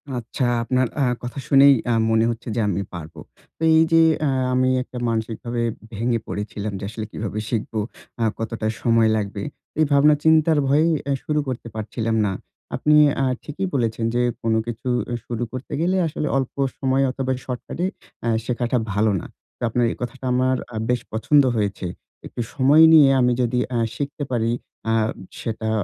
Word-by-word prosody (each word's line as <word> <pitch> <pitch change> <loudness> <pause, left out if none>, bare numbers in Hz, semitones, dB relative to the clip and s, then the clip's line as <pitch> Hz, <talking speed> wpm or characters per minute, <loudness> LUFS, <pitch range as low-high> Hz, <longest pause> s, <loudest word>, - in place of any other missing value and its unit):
আচ্ছা, 120 +2 -4 0.2
আপনার 130 +2 +1
আ - - +4 0.2
কথা 125 +3 -5
শুনেই 140 0 +7 0.2
আ - - +3 0.2
মনে 115 0 +3
হচ্ছে 115 +1 -8
যে, - - 0
আমি 100 -1 0
পারবো। 80 -2 -8 0.4
তো - - -24
এইযে 165 +1 +5 0.3
আ - - +2 0.2
আমি 130 0 +3
একটা 125 - -10
মানসিকভাবে 115 +1 -3 0.3
ভেঙে 115 +2 0
পড়েছিলাম 105 0 -4
যে, - - -8
আসলে 110 0 -5
কিভাবে 105 -1 -4
শিখবো? 110 -1 -2 0.4
আ - - +3 0.2
কতটা 115 -1 -3
সময় 115 -1 +3
লাগবে? 100 -1 -3 0.4
এই 155 - +5
ভাবনা 145 +2 +6
চিন্তার 160 0 +4
ভয়েই 150 +4 +3 0.2
এ - - +2
শুরু 150 0 0
করতে 125 -2 -4
পারছিলাম 110 +1 -2
না। 100 - 0 0.4
আপনি 150 0 +3 0.3
আ - - +2 0.2
ঠিকই 170 +6 -4
বলেছেন 115 -3 0
যে, 120 - +2 0.2
"কোন 115 -1 +1
কিছু 120 +2 -6 0.2
অ - - -1
শুরু 120 0 -3
করতে 130 +4 -7
গেলে 185 +3 +2
আসলে 150 0 -3
অল্প 135 -2 -2 0.2
সময় 135 0 +1
অথবা, 130 0 -2
শর্টকাটে 130 +7 -4 0.4
আ - - 0 0.2
শেখাটা 120 0 0 0.2
ভালো 105 +2 +2
না।" - - -9 0.3
তো - - -59
আপনার 120 +1 +1
এই - - -5
কথাটা 130 +2 -5
আমার 130 +1 +2 0.2
আ - - -6
বেশ 125 -1 +1
পছন্দ 140 +6 +4
হয়েছে। 100 -3 -1 0.4
একটু - - -5
সময় 145 +4 +5
নিয়ে 150 -4 +8
আমি 125 0 +3
যদি 125 0 +1 0.2
আ - - +2 0.2
শিখতে 145 +2 -4
পারি, 115 -2 +1 0.4
আ - - +2 0.5
সেটা 110 -1 -3
120 Hz, 175 wpm, -22 LUFS, 110-140 Hz, 0.5 s, নিয়ে